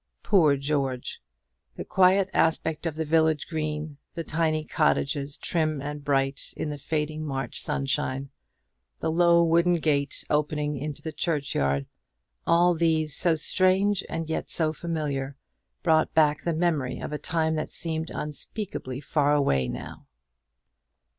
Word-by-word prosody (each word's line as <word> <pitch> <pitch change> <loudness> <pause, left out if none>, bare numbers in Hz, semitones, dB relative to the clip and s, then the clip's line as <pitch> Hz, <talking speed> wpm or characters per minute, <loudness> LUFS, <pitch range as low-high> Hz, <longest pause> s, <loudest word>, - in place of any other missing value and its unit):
Poor 155 -8 +4
George! 135 -3 -2 0.5
The - - -6
quiet 190 +1 +4
aspect 160 0 +1
of 160 - -3
the 160 0 -2
village 160 -1 +2
green, 155 -2 -3 0.2
the 165 - -3
tiny 160 -1 0
cottages, 145 -2 0
trim 155 -4 -1
and 145 +1 -5
bright 135 -1 0
in 150 - -3
the 145 - -6
fading 155 +1 -2
March 135 -3 -3
sunshine; 135 0 -2 0.7
the - - -1
low 170 0 +5
wooden 170 +1 +3
gate 145 -3 0
opening 150 0 0
into 145 +1 -5
the 160 - -4
churchyard, 135 - -1 0.6
all 175 +1 +5
these, 160 -2 +2
so 170 -2 +3
strange 190 +4 +3
and 165 -1 -3
yet 160 - -3
so 155 -2 +1
familiar, 145 -5 -3 0.5
brought 160 -2 +3
back 150 -2 +3
the 170 - +1
memory 155 -6 0
of - - -6
a 150 - -3
time 160 +1 0
that 155 -1 -3
seemed 160 -1 -2
unspeakably 150 - -5
far 145 0 +2
away 70 - +2
now. - - -7
155 Hz, 140 wpm, -26 LUFS, 145-165 Hz, 0.7 s, low